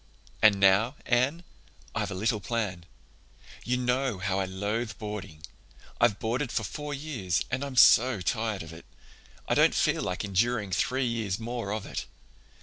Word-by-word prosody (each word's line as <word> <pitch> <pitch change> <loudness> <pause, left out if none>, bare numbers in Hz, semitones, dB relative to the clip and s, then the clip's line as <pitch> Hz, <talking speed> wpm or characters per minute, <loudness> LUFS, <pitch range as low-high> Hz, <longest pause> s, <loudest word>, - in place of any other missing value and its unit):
"And 105 -2 +6
now, 100 +7 +4
Anne, 130 +8 +1 0.5
I've - - -2
a - - -5
little 110 +3 0
plan. 100 -5 -3 0.8
You 125 +1 0
know 125 -2 0
how 95 +1 -1
I 95 - 0
loathe 105 +4 -3
boarding. 105 -8 -7 0.6
I've 100 - +3
boarded 120 +5 -2
for 110 - -1
four 150 +8 -5
years 135 - -2
and 130 +2 -1
I'm 140 -2 -5
so 125 -2 +6
tired 110 +1 -1
of 80 0 -10
it. 80 - -12 0.6
I - - +1
don't - - +4
feel - - +2
like 90 +4 -3
enduring 105 +1 0
three 130 +7 0
years 115 -5 -2
more 115 -2 -4
of 105 -1 -3
it. - - -5
110 Hz, 160 wpm, -28 LUFS, 95-125 Hz, 0.8 s, And